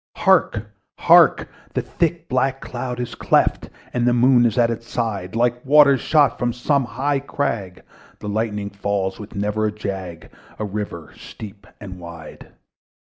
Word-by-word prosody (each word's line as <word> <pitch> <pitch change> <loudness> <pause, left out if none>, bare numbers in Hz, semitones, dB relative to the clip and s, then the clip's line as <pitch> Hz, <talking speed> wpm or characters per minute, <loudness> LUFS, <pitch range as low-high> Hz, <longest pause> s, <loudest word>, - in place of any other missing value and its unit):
The 110 - +3 0.4
thick 170 0 -2
black 130 +1 0
cloud 125 -1 -5
was 120 -1 -4
cleft, - - +1 0.2
and 120 - -1
still - - +2
The - - +1
Moon 125 0 +5
was 115 -1 0
at 120 -1 +3
its 115 0 -6
side: 105 -5 -3
Like 120 +1 +1
waters 140 -1 +5
shot 145 -6 +3
from 120 -1 0
some 135 +2 0
high 135 +5 -1
crag, 115 -9 -3 0.3
The 105 - -8
lightning 105 -1 -2
fell 100 -1 -2
with 105 +1 -10
never 105 +2 0
a - - -2
jag, 95 -5 -6 0.3
A 105 - -3
river 100 -5 -6
steep 105 -1 -11
and 95 -3 -9
wide. 85 -3 -11
115 Hz, 150 wpm, -21 LUFS, 100-130 Hz, 0.4 s, Moon